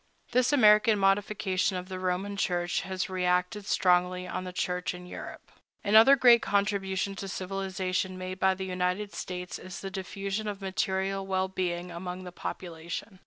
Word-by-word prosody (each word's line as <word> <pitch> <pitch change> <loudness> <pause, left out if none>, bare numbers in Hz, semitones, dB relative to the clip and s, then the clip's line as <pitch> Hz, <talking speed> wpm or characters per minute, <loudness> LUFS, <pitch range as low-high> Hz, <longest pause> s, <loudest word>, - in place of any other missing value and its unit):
This 250 +1 +3
American 215 -4 +6
modification 195 -1 +1
of 180 0 -6
the 185 -1 -6
Roman 185 +2 -1
Church 175 -3 0
has 190 -1 -3
reacted 180 +2 0
strongly 180 0 +2
on 185 0 -4
the 180 - -5
Church 180 0 -2
in 180 0 -10
Europe.Another 220 +6 +2
great 245 -3 +6
contribution 200 -1 0
to 195 - -5
civilization 185 -1 -2
made 185 0 -6
by 190 -1 +3
the 190 0 -5
United 185 +2 -2
States 180 0 -5
is 185 0 -8
the 195 - -5
diffusion 195 +2 -4
of 205 -2 -4
material 190 0 -1
well 190 0 +1
being 180 -1 -2
among 180 +2 -6
the 180 - -8
population. 170 +2 -6
190 Hz, 155 wpm, -29 LUFS, 180-200 Hz, -, American